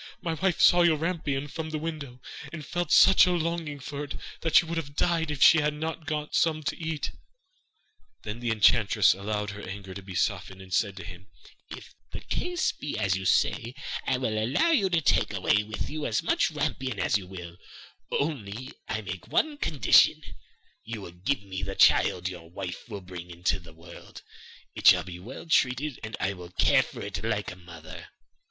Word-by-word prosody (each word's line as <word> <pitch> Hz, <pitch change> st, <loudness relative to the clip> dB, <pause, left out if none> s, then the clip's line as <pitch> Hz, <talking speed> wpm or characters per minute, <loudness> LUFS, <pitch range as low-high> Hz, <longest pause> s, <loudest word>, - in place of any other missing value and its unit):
My 165 Hz, -, -2 dB
wife 175 Hz, +2 st, 0 dB
saw 175 Hz, -, +6 dB
your 170 Hz, -2 st, +4 dB
rampion 150 Hz, -4 st, -2 dB
from 160 Hz, +2 st, -5 dB
the 155 Hz, -, -3 dB
window, 150 Hz, -6 st, -6 dB, 0.3 s
and 155 Hz, -3 st, -7 dB
felt 175 Hz, +5 st, -3 dB
such 190 Hz, -1 st, +7 dB
a -, -, +2 dB
longing 165 Hz, -3 st, -2 dB
for 140 Hz, +2 st, -6 dB
it 145 Hz, -, -6 dB, 0.2 s
that 165 Hz, -, -2 dB
she -, -, +7 dB
would 165 Hz, 0 st, -4 dB
have 145 Hz, -3 st, -5 dB
died 165 Hz, -1 st, +1 dB
if 150 Hz, -2 st, +1 dB
she 160 Hz, -, +8 dB
had 150 Hz, 0 st, 0 dB
not 160 Hz, 0 st, -5 dB
got 150 Hz, -1 st, -3 dB
some 155 Hz, -1 st, +2 dB
to -, -, -2 dB
eat.' 160 Hz, -3 st, -3 dB, 1.1 s
Then 105 Hz, +2 st, -5 dB
the 120 Hz, -1 st, -2 dB
enchantress 110 Hz, -1 st, +4 dB
allowed 105 Hz, +1 st, -3 dB
her 100 Hz, 0 st, -9 dB
anger 95 Hz, 0 st, -7 dB
to 100 Hz, -, -8 dB
be 95 Hz, -1 st, -9 dB
softened, 95 Hz, +2 st, -1 dB
and 95 Hz, -1 st, -10 dB
said 100 Hz, -1 st, +1 dB
to 95 Hz, -, -7 dB
him: 90 Hz, +2 st, -11 dB, 0.4 s
'If -, -, -10 dB, 0.2 s
the -, -, -5 dB
case 355 Hz, -1 st, -1 dB
be 145 Hz, -, -5 dB
as 100 Hz, -4 st, +1 dB
you 95 Hz, 0 st, -4 dB
say, 115 Hz, +6 st, +1 dB, 0.3 s
I 130 Hz, -, +2 dB
will 110 Hz, -4 st, -1 dB
allow 140 Hz, -, +2 dB
you 205 Hz, -12 st, +3 dB
to 170 Hz, -2 st, +2 dB
take -, -, +2 dB
away 105 Hz, -, +2 dB
with 105 Hz, +1 st, -5 dB
you 155 Hz, 0 st, -3 dB
as 110 Hz, -, 0 dB
much -, -, +2 dB
rampion 130 Hz, -6 st, -3 dB
as 105 Hz, -, +2 dB
you 95 Hz, -, -11 dB
will, 90 Hz, -2 st, -9 dB, 0.5 s
only 130 Hz, -4 st, -3 dB, 0.2 s
I 110 Hz, -, -2 dB
make 95 Hz, -3 st, -7 dB
one 310 Hz, -1 st, +1 dB
condition, 150 Hz, -, +4 dB, 0.6 s
you 115 Hz, -2 st, -6 dB
must 90 Hz, -1 st, -12 dB
give 140 Hz, -5 st, +1 dB
me 95 Hz, -1 st, -6 dB
the 95 Hz, +1 st, -4 dB
child 90 Hz, -, +4 dB
which 95 Hz, -, -1 dB
your 85 Hz, -2 st, -11 dB
wife 95 Hz, +4 st, -7 dB
will 100 Hz, -3 st, -6 dB
bring 90 Hz, -1 st, -9 dB
into 90 Hz, +2 st, -1 dB
the 85 Hz, -2 st, -14 dB
world; 80 Hz, +1 st, -13 dB, 0.5 s
it -, -, 0 dB
shall -, -, +8 dB
be 90 Hz, -2 st, -9 dB
well 120 Hz, -, -9 dB
treated, 135 Hz, -3 st, +1 dB
and 110 Hz, -1 st, -5 dB
I 95 Hz, +1 st, 0 dB
will 90 Hz, -2 st, -10 dB
care -, -, +4 dB
for -, -, -8 dB
it 95 Hz, -5 st, -5 dB
like 105 Hz, -2 st, -1 dB
a -, -, -9 dB
mother. 85 Hz, -3 st, -11 dB
115 Hz, 200 wpm, -27 LUFS, 95-155 Hz, 1.1 s, she